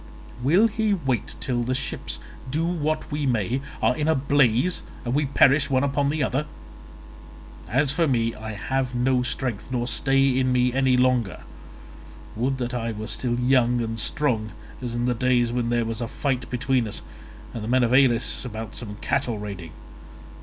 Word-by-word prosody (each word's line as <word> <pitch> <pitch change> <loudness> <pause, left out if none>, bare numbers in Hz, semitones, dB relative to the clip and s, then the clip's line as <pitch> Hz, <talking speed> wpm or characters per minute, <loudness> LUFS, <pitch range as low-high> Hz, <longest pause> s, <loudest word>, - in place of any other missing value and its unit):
Will 170 - +4
he 220 -1 +1
wait 130 - -2
till 125 -2 -1
the 125 +2 -1
ships, 135 - -4 0.3
do 155 +5 0
what 155 -3 -1
we 145 -1 -1
may, 120 +1 0 0.2
are - - +3
in 150 +2 -1
a 160 - +4
blaze, 140 +3 +2 0.2
and 120 - -1
we 145 +1 +1
perish 140 +1 +4
one 130 -1 +2
upon 140 0 +1
the 150 0 0
other? 135 +3 -1 1.2
As 135 +6 +2
for 165 +2 +2
me, 115 -4 +1
I 110 0 -7
have 130 +4 -2
no 125 +1 +2
strength 125 -2 -3
nor 120 -2 -1
stay 135 0 +2
in 130 -1 +2
me 125 0 +2
any 130 -1 +3
longer; 125 -6 +1 0.9
would 130 +4 0
that 125 -1 -3
I 115 -2 -2
were 110 0 -5
still 120 +2 -2
young 125 -1 +3
and 115 -1 -3
strong 115 -6 -1 0.3
as 120 -2 -4
in 120 0 0
the 125 - +2
days 120 -1 +2
when 120 -1 -1
there 120 -1 +1
was 115 +1 -4
a 120 - -2
fight 130 0 -2
between 125 -1 0
us 105 - -4 0.5
and 115 - -5
the - - -5
men 130 +1 +3
of 120 +1 +2
Elis 130 -3 +3
about 110 -3 -6
some 105 -4 -5
cattle 125 -5 0
raiding. 100 -6 -7
125 Hz, 180 wpm, -24 LUFS, 120-135 Hz, 1.2 s, Will